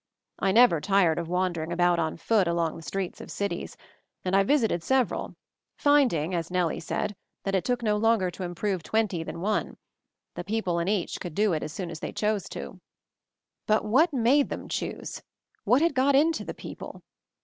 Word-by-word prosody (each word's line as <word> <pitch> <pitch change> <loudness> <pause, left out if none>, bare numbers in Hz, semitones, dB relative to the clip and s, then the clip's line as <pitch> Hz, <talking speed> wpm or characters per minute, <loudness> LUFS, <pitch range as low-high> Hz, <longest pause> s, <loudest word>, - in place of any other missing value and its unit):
I 195 - +2
never 220 -7 +5
tired 185 -4 +3
of 170 - -4
wander 180 -1 0
ing 160 +2 -5
about 175 0 +2
on 160 -1 -1
foot 200 +1 +2
along 170 -1 0
the - - -9
streets 190 +2 -4
of - - -10
cities, 200 -4 -4 0.5
and 185 +1 +1
I 195 - +6
visited 225 - +2
several, 260 +6 0 0.4
finding, 250 - +3
as 165 -2 -2
Nellie 180 -3 0
said, 205 +4 -3 0.3
that 195 - -2
it 190 - +2
took 245 -1 -1
no 210 -2 +2
longer 215 -4 +2
to 175 - -10
improve 180 +1 -2
twenty 210 -1 0
than 165 - -7
one; 210 +3 -1 0.6
the - - -5
people 190 -4 -1
in 170 - -1
each 200 -3 -1
could 175 -4 -6
do 210 -3 +2
it 155 - -1
as - - -5
soon 175 +1 -5
as 160 - -7
they - - -5
chose 210 -1 -1
to. - - -7 0.9
But 215 0 +2
what 280 +11 +4
made 270 +2 +3
them - - -5
choose? - - -4 0.4
What 245 +8 +4
had 335 - +2
got 270 +1 +3
into 315 +3 +3
the - - -6
people? - - -9
195 Hz, 195 wpm, -27 LUFS, 170-225 Hz, 0.9 s, I